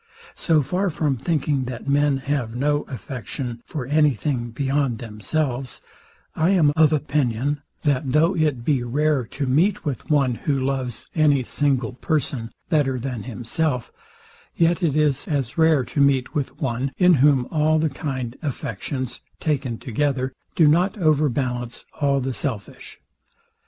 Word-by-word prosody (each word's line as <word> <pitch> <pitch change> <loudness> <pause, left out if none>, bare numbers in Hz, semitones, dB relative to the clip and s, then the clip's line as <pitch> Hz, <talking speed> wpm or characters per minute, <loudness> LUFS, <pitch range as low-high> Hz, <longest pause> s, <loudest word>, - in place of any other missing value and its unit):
So 160 -4 +2
far 180 +8 0
from 150 -4 0
thinking, 140 -1 0
that 125 +1 -7
men 145 0 +3
have 135 -4 -2
no 145 +3 +1
affection 125 -2 -6
for 140 -5 -5
any 150 0 +3
thing 120 +1 -2
beyond 135 0 0
themselves, 120 +4 -3 0.6
I 160 +3 +2
am 165 -7 +4
of 160 -2 +5
opinion, 145 -2 0 0.2
that 140 -2 +1
though 165 +6 +3
it 150 -8 0
be 140 -4 +2
rare 140 +2 +1
to 140 +5 -3
meet 165 +11 +2
with 140 -5 -4
one, 140 -5 +3
who 140 +3 -1
loves 130 -3 -2
any 145 -4 +3
single 130 -2 0
person 130 -4 -2 0.2
better 140 -5 +1
than 125 -2 -4
himself; 125 - -2 0.6
yet 170 +2 +2
it 160 -5 +1
is 150 -3 +1
as 140 -6 -1
rare 160 -5 +4
to 145 - -1
meet 135 -2 +2
with 145 -3 -3
one, 135 0 -1
in 180 -1 +6
whom 140 -3 +4
all 155 0 +3
the 160 +1 +2
kind 130 -4 -4
affections, 130 - -4 0.2
taken 135 -7 -1
together, 130 +2 -1 0.2
do 165 - +5
not 180 +7 +3
overbalance 135 - 0 0.2
all 140 -1 +3
the 130 0 -2
selfish. 115 -6 -5
140 Hz, 145 wpm, -23 LUFS, 125-150 Hz, 0.6 s, in